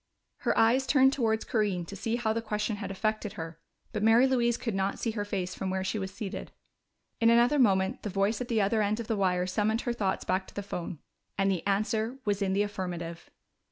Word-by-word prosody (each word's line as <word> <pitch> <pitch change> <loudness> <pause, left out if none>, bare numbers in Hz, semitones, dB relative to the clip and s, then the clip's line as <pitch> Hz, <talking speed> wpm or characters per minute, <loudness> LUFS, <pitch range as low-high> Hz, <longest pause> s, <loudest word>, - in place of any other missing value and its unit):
Her - - 0
eyes 250 +4 +4
turned 265 +1 +5
towards 225 -5 0
Corinne 200 -6 0
to 200 - -8
see 225 +4 -1
how 220 -2 0
the 230 - -1
question 210 -1 -2
had 200 - -5
affected 215 +1 -2
her, 165 0 -7 0.3
but 215 - -2
Mary 225 +4 +6
Louise 240 -3 +2
could 230 - -3
not 195 +1 -1
see 230 - -1
her 210 -2 -2
face 190 -3 -3
from 190 - -3
where 190 0 -1
she 210 +3 -2
was 190 -1 -3
seated. 200 0 -6 0.7
In 230 - +5
another 240 +5 +4
moment 195 0 +3
the 210 - -4
voice 200 +4 0
at 250 - -3
the 225 -3 +1
other 215 +2 +2
end 210 +2 0
of 230 - -3
the 225 - -1
wire 180 -3 +1
summoned 215 +4 0
her 240 - -1
thoughts 200 -5 -1
back 185 +1 0
to - - -15
the 205 - -3
phone. 180 -3 -5 0.4
And 195 0 +2
the 180 -3 -1
answer 220 +4 0
was 205 -1 0
in 190 -1 +1
the 200 +1 +3
affirmative! 175 -4 -5
210 Hz, 225 wpm, -29 LUFS, 190-230 Hz, 0.7 s, Mary